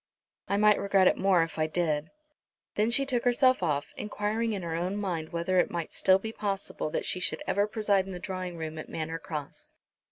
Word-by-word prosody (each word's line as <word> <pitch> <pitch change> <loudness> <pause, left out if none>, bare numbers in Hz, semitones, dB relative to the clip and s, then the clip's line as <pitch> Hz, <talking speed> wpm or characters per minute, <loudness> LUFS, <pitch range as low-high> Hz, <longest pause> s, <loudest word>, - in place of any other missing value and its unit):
"I 200 - +1
might 210 0 +5
regret 195 -1 +3
it - - +4
more 190 -3 +3
if 160 -1 -6
I 155 - +2
did." 155 -2 -1 0.6
Then 215 +2 +2
she 275 +3 +3
took 250 -3 -1
herself 255 -1 +4
off, 145 -4 -1
enquiring 215 +2 -1
in 195 -3 -4
her 165 -1 -3
own 175 +4 -1
mind 175 -6 -3
whether 170 +2 +1
it - - +2
might 170 -2 -4
still 190 0 +4
be 220 +3 -5
possible 200 -7 -3
that - - -2
she 185 - -1
should - - 0
ever 205 +1 +1
preside 205 -3 +1
in - - -6
the 180 - -5
drawing 185 -2 -5
room 160 -1 -5
at - - -8
Manor 160 +1 -4
Cross. 150 -3 -7
185 Hz, 215 wpm, -29 LUFS, 165-210 Hz, 0.6 s, might